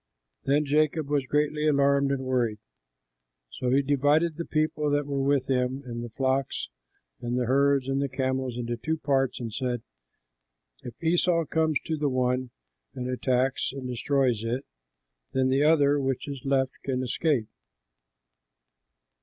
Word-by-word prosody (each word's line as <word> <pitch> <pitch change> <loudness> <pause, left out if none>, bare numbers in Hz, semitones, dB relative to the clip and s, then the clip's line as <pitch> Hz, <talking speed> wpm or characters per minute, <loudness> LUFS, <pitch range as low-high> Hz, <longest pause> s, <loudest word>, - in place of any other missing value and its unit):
Then 145 +2 +2
Jacob 150 +1 +1
was 145 -3 0
greatly 150 +1 +1
alarmed 140 -1 +3
and 135 -1 -1
worried. 120 -4 0 0.9
So 125 - -3
he 135 +3 +3
divided 145 +4 +2
the 170 +1 -4
people 155 -1 0
that 145 0 +1
were 140 -1 -2
with 135 -1 +1
him 130 +1 0
and 120 -1 -5
the 120 - -6
flocks 130 - -1 0.5
and 120 +1 -2
the 125 - +1
herds 140 +1 +3
and 135 0 0
the 140 - -1
camels 130 -1 -2
into 120 -1 -3
two 160 +7 -2
parts 135 -3 0
and 115 -3 -5
said, 125 -2 -2 1.0
"If 120 - -8
Esau 170 0 +2
comes 160 -1 +1
to 160 - -2
the 145 -1 0
one 130 0 0 0.5
and 125 - -4
attacks 130 +1 0
and 130 -1 -6
destroys 125 -2 0
it, 120 +4 -2 0.7
then 130 0 +2
the 135 +2 +2
other 145 -2 +4
which 135 0 -2
is 140 -2 -6
left 135 -1 +2
can 130 -1 -1
escape." 130 -2 0
135 Hz, 155 wpm, -27 LUFS, 125-145 Hz, 1.0 s, other